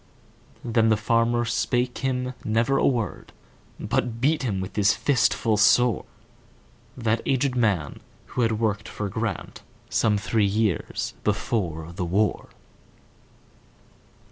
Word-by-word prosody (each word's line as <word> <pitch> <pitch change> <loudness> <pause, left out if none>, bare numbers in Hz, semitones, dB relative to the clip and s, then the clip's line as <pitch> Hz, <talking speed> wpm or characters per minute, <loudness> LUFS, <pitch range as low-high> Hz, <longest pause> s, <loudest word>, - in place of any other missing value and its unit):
Then 115 -1 +2
the 110 - +3
farmer 115 +2 +1
spake 125 +2 0
him 125 -1 -2
never 115 +5 +1
a - - +3
word, 115 -8 -2 0.5
But 120 +1 -1
beat 145 +4 +1
with 95 0 -4
his 105 -1 +3
fist 130 -6 +2
full 110 -2 0
soreThat 120 0 -1
aged 135 0 +1
man, 100 - 0 0.3
who 125 - 0
had 115 -2 +1
worked 105 -2 -1
for 105 -2 -4
GrantSome 110 0 -2
three 110 +2 +1
years 105 -2 -1
before 85 -7 -1
the 90 +1 -4
war. 100 +5 0
115 Hz, 115 wpm, -25 LUFS, 105-120 Hz, 0.5 s, the